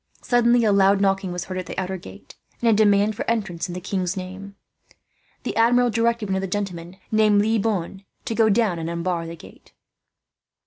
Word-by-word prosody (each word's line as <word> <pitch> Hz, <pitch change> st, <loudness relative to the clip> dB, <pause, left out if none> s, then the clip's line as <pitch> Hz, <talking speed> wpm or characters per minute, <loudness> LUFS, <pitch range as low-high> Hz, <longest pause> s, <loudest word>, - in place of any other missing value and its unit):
Suddenly 240 Hz, -1 st, +3 dB
a 215 Hz, -, +3 dB
loud 200 Hz, 0 st, +4 dB
knocking 195 Hz, -1 st, +1 dB
was 175 Hz, 0 st, -4 dB
heard 185 Hz, -1 st, -5 dB
at 180 Hz, -, -6 dB
the -, -, -7 dB
outer 190 Hz, 0 st, -2 dB
gate, 100 Hz, -, -12 dB, 0.3 s
and 235 Hz, -, 0 dB
a 225 Hz, -, +5 dB
demand 205 Hz, 0 st, +3 dB
for -, -, -3 dB
entrance, 195 Hz, -7 st, -2 dB
in 175 Hz, -, -7 dB
the -, -, -4 dB
king's 185 Hz, 0 st, -3 dB
name. 190 Hz, +2 st, -8 dB, 0.9 s
The -, -, -4 dB
Admiral 245 Hz, +1 st, +3 dB
directed 230 Hz, -1 st, 0 dB
one 190 Hz, -, 0 dB
of -, -, -2 dB
the 195 Hz, -, -3 dB
gentlemen, 180 Hz, -2 st, -5 dB
named 215 Hz, -1 st, +4 dB
Le 220 Hz, 0 st, +1 dB
Bonne, 195 Hz, -2 st, -2 dB, 0.2 s
to -, -, -2 dB
go 220 Hz, -1 st, +3 dB
down 205 Hz, -5 st, +1 dB
and 165 Hz, 0 st, -4 dB
unbar 170 Hz, 0 st, -2 dB
the 165 Hz, -, -7 dB
gate. -, -, -17 dB
195 Hz, 205 wpm, -23 LUFS, 180-220 Hz, 0.9 s, a